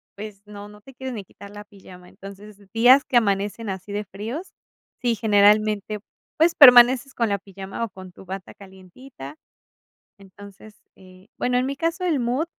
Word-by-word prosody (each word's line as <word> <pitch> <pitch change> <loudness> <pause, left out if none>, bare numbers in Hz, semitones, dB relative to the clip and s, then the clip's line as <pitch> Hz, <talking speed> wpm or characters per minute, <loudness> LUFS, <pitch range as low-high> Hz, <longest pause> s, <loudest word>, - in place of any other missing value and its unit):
pues, 205 -1 -10
no 205 0 -11
no 210 0 -16
te 270 +4 -16
quieres 260 0 -7
ni 210 -4 -7
quitar 200 +2 -14
la 205 0 -10
pijama. 185 -3 -16
Entonces 200 +1 -13
esos 200 -1 -23
días 245 +4 +5
que 250 - +1
amanecen 205 0 -1
así 190 +1 -7
de 205 0 -4
fríos, 225 - -7 0.5
sí, 240 -3 0
generalmente, 210 -1 +2 0.4
pues 330 +2 +3
permaneces 250 -1 +7
con 230 -3 -1
la 200 - -1
pijama, 195 +2 -8
o - - -10
con 185 -1 -13
tu 190 - -16
bata 190 0 -8
calentita. 190 - -13 0.8
Entonces, 200 +2 -15 0.2
eh, 185 0 -19
bueno, 250 0 0
en 250 - 0
mi 275 +1 -4
caso 335 +5 -3
el 315 -6 0
mood 250 +6 -1
210 Hz, 175 wpm, -22 LUFS, 195-245 Hz, 0.8 s, permaneces